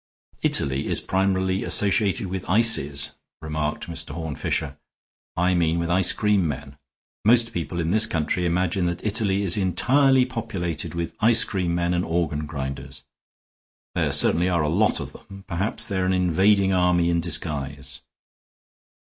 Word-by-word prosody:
"Italy 65 0 +2
is - - +2
primarily 95 0 -1
associated 100 0 +1
with 95 0 -6
ices," 75 -9 +3 0.3
remarked 75 -1 -4
Mr. 80 -3 -5
Horne 80 -3 -5
Fisher. - - -3 0.6
"I 90 +2 +2
mean 85 -2 +1
with 85 0 -2
ice 90 0 +5
cream 105 -5 +1
men. 70 -2 -7 0.5
Most 115 +1 +3
people 85 -1 -4
in 85 0 -1
this 110 +2 +5
country 85 +2 -1
imagine 90 +1 0
that 85 +3 -5
Italy 100 -2 -1
is 90 -1 +2
entirely 130 - +2
populated 100 - -4
with 85 -1 -4
ice 115 +1 +5
cream 90 -4 -2
men 85 0 -1
and 90 0 0
organ 80 -3 -2
grinders. 70 -2 -7 0.9
There - - -1
certainly 90 +2 +3
are 85 -3 0
a 75 - 0
lot 100 +7 +1
of - - -7
them; 100 0 -14
perhaps 95 +3 -2
they're 95 -3 -2
an 95 - +1
invading 95 +2 +2
army 90 -1 +2
in 85 0 0
disguise." 70 -5 -3
90 Hz, 150 wpm, -23 LUFS, 80-100 Hz, 0.9 s, ice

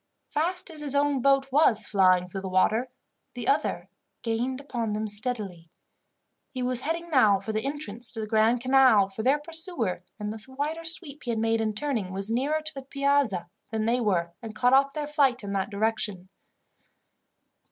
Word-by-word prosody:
Fast 350 +4 -2
as 310 - -10
his 285 -2 -3
own 285 -2 +2
boat 275 0 +2
was 250 -7 +4
flying 185 -3 +3
through 195 +1 -6
the 190 - -5
water, 215 +7 +2 0.5
the - - -5
other - - 0 0.4
gained 245 +3 -1
upon 235 -6 -3
them 215 +1 -2
steadily. 205 -6 -3 0.8
He 255 -2 -5
was 250 -1 0
heading 335 +3 -3
now 215 -9 +5
for 200 +3 -5
the 215 - -1
entrance 270 -5 0
to 225 - -6
the 220 - -2
Grand 220 +2 +2
Canal, 255 -6 +5
for 195 +3 -5
their 265 +5 +3
pursuer, 310 - -3 0.2
in 210 0 -3
the 220 -1 -8
wider 310 +3 -2
sweep 325 -3 -4
he 245 - -7
had 230 - 0
made 225 0 +1
in 215 -1 -1
turning, 225 -7 -2
was 195 +3 +3
nearer 285 +6 0
to 310 +1 -6
the 270 - -7
Piazza 275 -9 0 0.2
than 220 0 -2
they 240 +2 +1
were, 175 -6 0
and 220 -2 -8
cut 245 +3 +3
off 275 +1 +5
their 300 -1 -3
flight 280 -5 +1
in 200 0 -4
that 195 +1 -1
direction. 205 -3 -2
240 Hz, 185 wpm, -27 LUFS, 210-280 Hz, 0.8 s, now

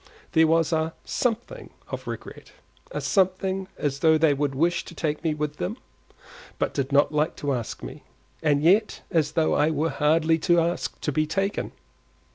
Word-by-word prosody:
There 160 0 +5
was 165 +1 +2
a 160 0 0
something 245 - -2 0.2
of - - -6
regret, - - -8 0.4
a - - -4
something 190 0 +1
as 140 -2 -2
though 160 +1 +5
they 155 -2 +4
would 140 -1 -1
wish 170 +5 +1
to 170 - -11
take 150 -3 -2
me 160 -2 0
with 150 0 -3
them, 90 - -3 0.8
but - - -1
did 140 0 -2
not 145 +1 +4
like 150 +1 0
to 145 -1 -2
ask 120 -3 -4
me, - - -8 0.4
and 150 -2 +2
yet 205 +6 +3
as 150 -3 +1
though 160 0 +2
I 150 +2 +3
were 160 +1 0
hardly 160 +2 +2
to 175 +1 +3
ask 170 +1 -1
to 150 - -1
be 155 +2 0
taken. 195 +5 -1
160 Hz, 180 wpm, -25 LUFS, 150-175 Hz, 0.8 s, There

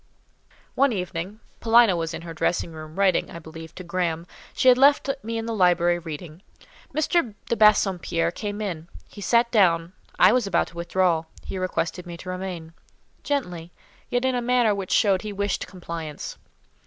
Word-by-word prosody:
One 275 0 +3
evening—Paulina 205 +3 +1
was 165 -2 -2
in - - -8
her 165 -1 -7
dressing 165 +1 -1
room, 155 0 -10
writing, 195 -3 +2
I - - -8
believe, 160 0 -11
to 185 - -8
Graham; 170 -2 -2 0.3
she - - 0
had 250 -1 +8
left 280 0 +5
me 230 -1 -4
in 225 - -3
the 230 - -3
library, 175 -3 +3
reading—M. 180 - -4
de 235 - +1
Bassompierre 190 -6 +3
came 205 +3 -5
in; 170 -6 -4 0.2
he 205 - -12
sat 235 +3 +2
down: 175 -5 +3 0.2
I 185 +4 +6
was 250 -5 +1
about 175 -3 +1
to - - -18
withdraw; 170 -1 +1 0.2
he 190 - -5
requested 180 -1 -2
me 170 -1 -7
to 185 - -9
remain—gently, 180 - -6 0.4
yet 245 +1 0
in 260 - +2
a 245 - 0
manner 240 -3 +3
which 195 -2 -5
showed 195 -3 +3
he 210 - -5
wished 200 0 -2
compliance. 165 -5 -7
185 Hz, 165 wpm, -24 LUFS, 170-220 Hz, 0.4 s, had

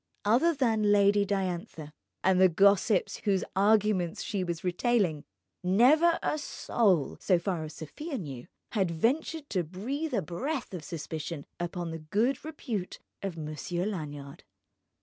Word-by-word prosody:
Other 260 +11 +4
than 220 -6 +2
Lady 205 0 +4
Diantha 180 -5 -3 0.3
and 185 0 +4
the 185 - +7
gossips 200 +2 +3
whose 195 -3 0
arguments 200 -3 +2
she 200 -3 -2
was 170 -2 -4
retailing, 180 - +1 0.4
never 275 - +5
a 305 - 0
soul 195 - +1
(so 185 - +3
far 170 -1 -2
as 155 0 -9
Sofia 275 - -6
knew) 135 - -7 0.2
had 195 -6 +1
ventured 280 - 0
to 185 -3 +1
breathe 250 - -3
a 200 - 0
breath 250 - -4
of 175 -4 -5
suspicion 155 -1 -5
upon 175 -1 -3
the 165 - -5
good 215 - 0
repute 245 - -4 0.2
of 195 -4 -4
Monsieur 160 +3 -3
Lanyard. 145 -8 -6
190 Hz, 140 wpm, -29 LUFS, 170-230 Hz, 0.4 s, the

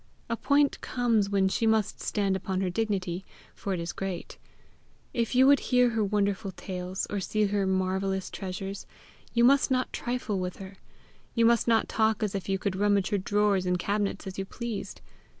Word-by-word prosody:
A - - +2
point 285 +4 +2
comes 230 -5 +1
when 195 -1 +2
she 225 +4 +1
must 220 -2 +1
stand 200 -2 0
upon 190 0 -2
her 185 -2 0
dignity, 190 -3 -1 0.3
for 200 - -5
it 185 - -1
is 170 0 -3
great. 190 -2 -5 0.7
If 235 +1 -1
you 260 +1 +6
would 280 +1 +6
hear 250 -1 +4
her 225 -1 +1
wonderful 200 0 0
tales, 185 +1 -4
or 205 - -1
see 215 +3 0
her 200 -1 0
marvellous 190 0 -1
treasures, 195 +1 -5 0.5
you 235 - +4
must 275 +4 +5
not 255 -1 0
trifle 240 -5 -2
with 180 0 -4
her; 195 0 -10 0.6
you 230 -1 +4
must 235 0 +4
not 225 -1 +3
talk 220 0 +1
as 210 - -1
if 195 -2 -4
you 195 - +2
could 190 0 -2
rummage 200 -1 +2
her 205 - +2
drawers 200 -1 +1
and 180 0 +2
cabinets 200 +2 -1
as 190 0 -6
you 195 - -2
pleased. 205 -2 -6
200 Hz, 185 wpm, -28 LUFS, 190-225 Hz, 0.7 s, you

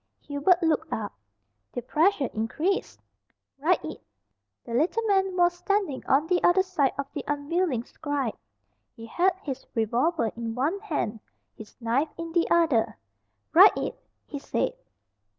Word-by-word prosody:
Hubert 320 +5 +2
looked 320 0 +1
up. 210 -2 -3 0.6
The 245 - -4
pressure 305 - +2
increased. 305 - -1 0.6
"Write 335 +6 +2
it." - - -7 0.6
The 235 - -7
little 335 - +1
man 385 -3 +1
was 350 0 +4
standing 360 -5 -1
on 280 +3 +3
the 355 +1 +1
other 375 +2 +5
side 345 -8 +1
of 280 - -2
the - - -4
unwilling 290 -2 0
scribe. 280 -4 -3 0.6
He 225 - -10
had 355 +10 +1
his 270 -2 -5
revolver 235 +3 +1
in 230 -1 -4
one 300 +10 0
hand, 290 - -3 0.4
his 215 - -13
knife 250 +6 0
in 335 0 -5
the 340 0 +1
other. 250 -10 +2 0.6
"Write - - +8
it!" - - -3 0.3
he - - -6
said. - - -1
300 Hz, 145 wpm, -26 LUFS, 245-355 Hz, 0.6 s, Write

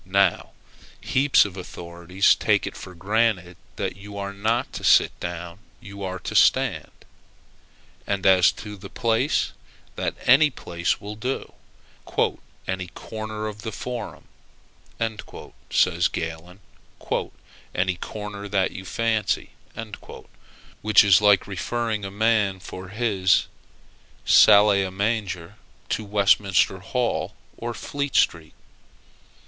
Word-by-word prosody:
Now, 95 -1 +1 0.5
heaps 135 -2 +3
of 100 -3 -7
authorities 90 0 0
take - - +1
it - - -6
for 90 - -10
granted, 95 -1 0 0.2
that - - -3
you 100 0 -10
are 100 0 -4
not 110 +5 -1
to - - -6
sit - - +5
down 85 +1 -6 0.2
you 100 -3 -11
are 95 -1 -3
to - - -5
stand; - - +3 1.2
and, 100 -2 -2
as 95 -2 +6
to 105 -1 -9
the - - -10
place, 115 +4 0 0.5
that - - -2
any 145 +4 +6
place 85 -9 -2
will 105 +1 -7
do 125 +5 -4 1.1
"any 95 -1 -3
corner 110 +3 -6
of 105 -1 -6
the 110 - -5
forum," 120 +1 -6 1.5
says - - +3
Galen, 85 +4 -6 1.1
"any 95 0 +1
corner 105 +1 -7
that 95 -1 +1
you 95 - -8
fancy;" 110 0 -1 1.3
which 110 0 +6
is 100 -1 +5
like 105 -2 +5
referring 105 +3 -3
a - - -4
man 105 -2 +1
for 95 0 -9
his 100 -3 +2 0.8
salle 105 +1 +7
à 100 -2 +1
manger 100 -2 -2 0.3
to 110 - -1
Westminster 100 -2 +2
Hall 120 +5 -2 0.2
or 120 0 -5
Fleet 140 -1 -4
Street. 80 -2 +1
100 Hz, 120 wpm, -24 LUFS, 95-110 Hz, 1.5 s, salle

